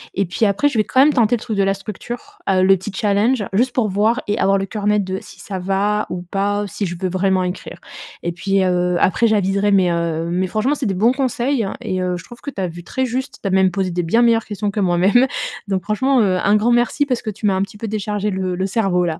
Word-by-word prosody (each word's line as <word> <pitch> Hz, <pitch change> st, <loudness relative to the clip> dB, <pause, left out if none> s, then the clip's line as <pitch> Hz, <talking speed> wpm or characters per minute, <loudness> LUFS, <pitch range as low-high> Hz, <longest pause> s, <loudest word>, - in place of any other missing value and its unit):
et 195 Hz, -, +1 dB
puis 185 Hz, +5 st, 0 dB
après, 205 Hz, +9 st, +2 dB
je 235 Hz, -, -1 dB
vais -, -, +4 dB
quand 260 Hz, -, +3 dB
même 295 Hz, +2 st, +5 dB
tenter 240 Hz, -2 st, +3 dB
le 230 Hz, -, -6 dB
truc 230 Hz, -3 st, -4 dB
de 200 Hz, -, +1 dB
la 195 Hz, 0 st, +2 dB
structure, 240 Hz, -, -8 dB
heu, 185 Hz, -1 st, +3 dB
le 195 Hz, +1 st, +6 dB
petit 190 Hz, +4 st, -7 dB
challenge, 210 Hz, +4 st, +1 dB
juste 245 Hz, +5 st, +2 dB
pour 225 Hz, -4 st, +1 dB
voir 215 Hz, +6 st, +1 dB
et 205 Hz, +1 st, -1 dB
avoir 195 Hz, 0 st, +3 dB
le 195 Hz, -, -2 dB
cœur 205 Hz, +1 st, -4 dB
net 210 Hz, -1 st, +3 dB
de 190 Hz, 0 st, -4 dB
si -, -, -14 dB
ça 190 Hz, -2 st, -5 dB
va 195 Hz, +3 st, 0 dB
ou 180 Hz, 0 st, -5 dB
pas, 200 Hz, +3 st, -1 dB
ou -, -, -4 dB
si 200 Hz, +1 st, -3 dB
je 175 Hz, -, -5 dB
veux 185 Hz, -, -1 dB
vraiment 185 Hz, 0 st, +1 dB
écrire. 180 Hz, +1 st, -5 dB, 0.5 s
Et 175 Hz, -, -1 dB
puis, 195 Hz, +3 st, 0 dB
heu, 180 Hz, -1 st, +1 dB
après, 230 Hz, +5 st, +3 dB
j'aviserai, 200 Hz, -1 st, +1 dB
mais 190 Hz, -3 st, +3 dB
heu 170 Hz, -1 st, -1 dB
mais 185 Hz, +2 st, 0 dB
franchement, 215 Hz, +9 st, 0 dB
c'est 275 Hz, -6 st, -2 dB
des 195 Hz, -, -1 dB
bons 220 Hz, +6 st, +3 dB
conseils, 265 Hz, -1 st, 0 dB
hein, 195 Hz, -, -4 dB
et 185 Hz, 0 st, -3 dB
heu, 180 Hz, -1 st, -1 dB
je 175 Hz, -, -10 dB
trouve 240 Hz, +5 st, -14 dB
que 285 Hz, -, -5 dB
tu 240 Hz, -, -8 dB
as 185 Hz, -, 0 dB
vu 175 Hz, 0 st, -9 dB
très 260 Hz, +9 st, -2 dB
juste. 260 Hz, +2 st, -4 dB
Tu -, -, -1 dB
as -, -, -1 dB
même 190 Hz, 0 st, +4 dB
posé 185 Hz, 0 st, -2 dB
des 175 Hz, +1 st, -1 dB
bien 200 Hz, +8 st, +2 dB
meilleures 230 Hz, -1 st, +3 dB
questions 205 Hz, 0 st, -3 dB
que 210 Hz, -, -3 dB
moi-même. 195 Hz, +7 st, +3 dB, 0.4 s
Donc 190 Hz, -2 st, -1 dB
franchement, 260 Hz, +8 st, +1 dB
heu, 185 Hz, -3 st, +2 dB
un 200 Hz, +1 st, +4 dB
grand 215 Hz, +3 st, +2 dB
merci 240 Hz, +4 st, +2 dB
parce 250 Hz, -4 st, -1 dB
que 220 Hz, -, -4 dB
tu 215 Hz, +1 st, -6 dB
m'as 200 Hz, -, +3 dB
un 190 Hz, -, 0 dB
petit 200 Hz, +1 st, -5 dB
peu 225 Hz, +1 st, -5 dB
déchargé 210 Hz, 0 st, -2 dB
le 185 Hz, -1 st, -2 dB
le 185 Hz, +1 st, -1 dB
cerveau 195 Hz, -3 st, +1 dB
là. 160 Hz, -2 st, -3 dB
200 Hz, 280 wpm, -19 LUFS, 185-225 Hz, 0.5 s, le